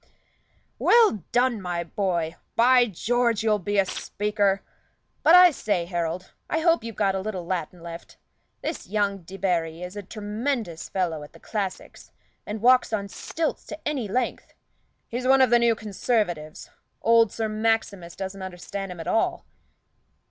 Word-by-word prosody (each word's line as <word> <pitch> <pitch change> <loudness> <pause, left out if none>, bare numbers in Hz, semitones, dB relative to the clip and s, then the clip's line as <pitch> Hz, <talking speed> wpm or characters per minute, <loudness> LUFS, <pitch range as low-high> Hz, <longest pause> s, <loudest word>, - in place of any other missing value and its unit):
"Well 440 - +5
done, 245 -3 +2
my 175 -2 -2
boy! 170 -2 -1 0.2
By 245 +1 +5
George, 235 +3 0
you'll 215 -2 +2
be 205 +2 -2
a 195 - +4
speaker! 205 0 -1 0.6
But 335 - +7
I 360 -1 +9
say, 205 - -1
Harold, 170 0 -3 0.2
I 320 - 0
hope 335 -3 +3
you've 230 -2 -6
got 195 -2 +1
a 190 - -1
little 190 -3 -4
Latin 180 -1 -3
left. 170 0 -9 0.5
This - - -4
young 200 0 0
Debarry 175 -2 -2
is 180 +2 -7
a 205 - -4
tremendous 210 - -4
fellow 170 -5 -1
at 145 - -11
the - - -15
classics, 200 -4 -5 0.4
and 210 +1 -5
walks 255 0 +5
on 200 -2 -2
stilts 320 - -3
to 310 - -7
any 275 -7 -1
length. 245 +5 -2 0.5
He's 250 +2 -3
one 270 +1 +6
of 260 -2 +5
the 240 - +6
new 235 -1 +3
Conservatives. 200 -7 -2 0.3
Old 230 -1 +5
Sir 225 -1 -2
Maximus 215 -5 -1
doesn't 195 0 -6
understand 190 +1 -6
him 175 - -9
at 165 - -6
all." 225 - 0
205 Hz, 155 wpm, -25 LUFS, 180-230 Hz, 0.6 s, I